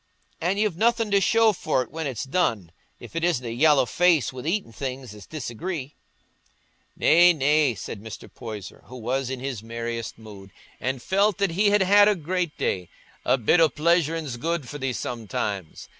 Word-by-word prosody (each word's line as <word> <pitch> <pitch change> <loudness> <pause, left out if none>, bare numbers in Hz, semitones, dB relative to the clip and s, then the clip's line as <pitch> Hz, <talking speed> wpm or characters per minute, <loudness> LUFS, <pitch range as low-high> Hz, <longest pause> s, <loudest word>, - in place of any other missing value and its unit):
An' 180 +4 0
you've 205 -5 0
nothing 225 0 +2
to 200 0 +4
show 225 +2 +4
for't 150 -8 -1
when 160 -1 -4
it's 125 -5 -4
done, 130 - -1 0.3
if - - -12
it 165 - -2
isn't 165 -8 +1
a 115 - -4
yallow 145 +1 +4
face 165 +1 +2
wi' 130 +3 -7
eatin' 195 - -1
things 130 -1 -6
as 105 -2 -13
disagree." 150 +1 -5 1.0
"Nay, 175 +2 +6
nay," 145 -3 +2
said 100 +2 -7
Mr. 110 0 -9
Poyser, 110 -5 -9
who 130 - -12
was 125 +2 -2
in 130 -1 -4
his 130 -4 -4
merriest 115 0 -5
mood, 105 -3 -12 0.3
and 130 -1 -3
felt 200 +1 +2
that 200 -3 +1
he 200 +5 +3
had 205 -1 +4
had 205 +2 +6
a 210 - +4
great 175 0 -3
day, 90 -2 -2 0.4
"a - - +3
bit 125 +8 +3
o' 165 -1 +6
pleasuring's 160 -3 0
good 165 +1 -2
for 145 - -7
thee 135 -1 -1
sometimes. 105 -7 -4
145 Hz, 180 wpm, -25 LUFS, 120-175 Hz, 1.0 s, Nay